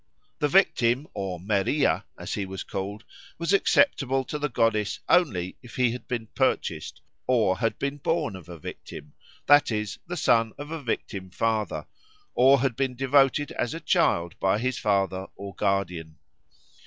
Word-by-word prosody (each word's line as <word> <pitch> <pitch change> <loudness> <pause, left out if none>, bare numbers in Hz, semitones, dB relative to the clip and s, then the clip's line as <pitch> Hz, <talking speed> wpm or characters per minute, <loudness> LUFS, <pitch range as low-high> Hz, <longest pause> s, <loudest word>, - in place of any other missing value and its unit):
The 150 - +2
victim 135 -6 +3
or 95 -3 -4
Meriah, 100 - +1
as - - -5
he 100 -2 -2
was 95 0 -6
called, 100 +3 -5 0.3
was 170 +3 -1
acceptable 135 - +3
to 150 +3 -5
the 150 0 -1
goddess 105 -5 +1
only 95 - +2
if 120 -3 -13
he 125 -2 +2
had 125 - -7
been 120 -2 -3
purchased, - - -1 0.3
or 110 -7 +2
had 115 -2 0
been 140 +1 -2
born 145 - -1
a 95 - -8 0.2
victim 75 -1 -9 0.3
that 145 +1 +6
is, 105 -2 -3
the 180 +1 -4
son 115 -6 +3
of 145 +2 -8
a 165 -2 -4
victim 100 -6 -4
father, 110 +3 -1 0.5
or 135 +1 +5
had 130 -3 0
been 130 0 -1
devoted 135 +2 +3
as 120 - -2
a - - -5
child 85 - +1
by 95 +1 +2
his 130 +2 -1
father 95 -3 0
or 100 0 -8
guardian. 90 -5 -2
115 Hz, 160 wpm, -26 LUFS, 100-135 Hz, 0.5 s, that